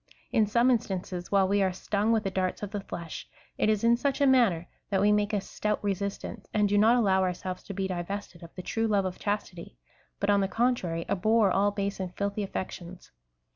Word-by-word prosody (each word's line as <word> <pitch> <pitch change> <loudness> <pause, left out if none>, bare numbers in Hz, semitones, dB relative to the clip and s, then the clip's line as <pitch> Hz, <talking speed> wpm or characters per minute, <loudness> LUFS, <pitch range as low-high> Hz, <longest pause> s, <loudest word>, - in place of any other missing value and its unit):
In 220 -4 +3
some 235 +4 +3
instances, 185 -6 -2
while 195 -1 +4
we 200 +1 +2
are 190 -1 +2
stung 205 +4 -1
with 220 -2 +2
the 195 - -2
darts 185 +1 -2
of 200 - -4
the 205 -2 -3
flesh, 170 -4 -7 0.3
it - - +3
is 215 -1 +1
in 235 +1 +5
such 275 +3 -1
a 285 - +4
manner 230 -11 +3 0.2
that 195 -2 +1
we 205 +2 +4
make 210 0 +2
a 210 - +1
stout 210 +2 -2
resistance, 200 +1 -3
and 210 -1 +4
do 205 - +1
not 220 +4 +5
allow 195 -6 +3
ourselves 185 0 -3
to 200 - -6
be 190 0 -1
divested 185 0 -5
of 170 - -10
the 180 - -7
true 225 +4 -1
love 200 -3 +2
of 185 -1 -4
chastity, 200 - -4 0.4
but 200 0 +2
on 200 0 +4
the 195 - +1
contrary, 190 -8 0
abhor 215 +1 +3
all 200 +2 +3
base 200 -1 -3
and 185 -1 -5
filthy 200 +1 -1
aflections. 185 -2 -6
200 Hz, 215 wpm, -28 LUFS, 185-215 Hz, 0.4 s, in